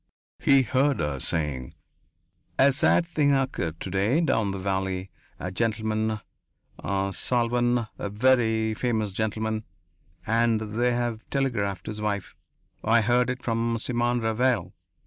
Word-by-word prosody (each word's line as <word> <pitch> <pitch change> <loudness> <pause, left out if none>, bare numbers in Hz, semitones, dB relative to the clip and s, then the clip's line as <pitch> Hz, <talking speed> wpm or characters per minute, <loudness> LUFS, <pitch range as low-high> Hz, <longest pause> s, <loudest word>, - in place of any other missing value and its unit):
He 135 -1 +5
heard 135 +3 +1
her 75 -3 -1
saying: 70 -5 -3 0.8
"A 140 +1 +6
sad 140 +5 +3
thing 145 -4 +2
occurred 105 - -2
to - - -5
day 100 +10 +2
down 115 -11 +1
the 100 - -3
valley. 95 0 -2 0.3
A 90 - -4
gentleman.... 110 0 -1 0.6
Salvan... 120 +5 +1
a 100 - -3
very 110 -1 +2
famous 110 -3 -1
gentleman.... 110 +1 -2 0.6
And 115 0 +2
they 110 +3 0
have 120 -2 -2
telegraphed 115 -8 -1
his 105 0 -5
wife.... 100 -3 -2 0.5
I 115 +1 +4
heard 120 +2 +2
it 125 0 -4
from 115 0 0
Simon 120 +1 0
Ravanel.... 110 -4 +1
110 Hz, 125 wpm, -26 LUFS, 100-125 Hz, 0.8 s, A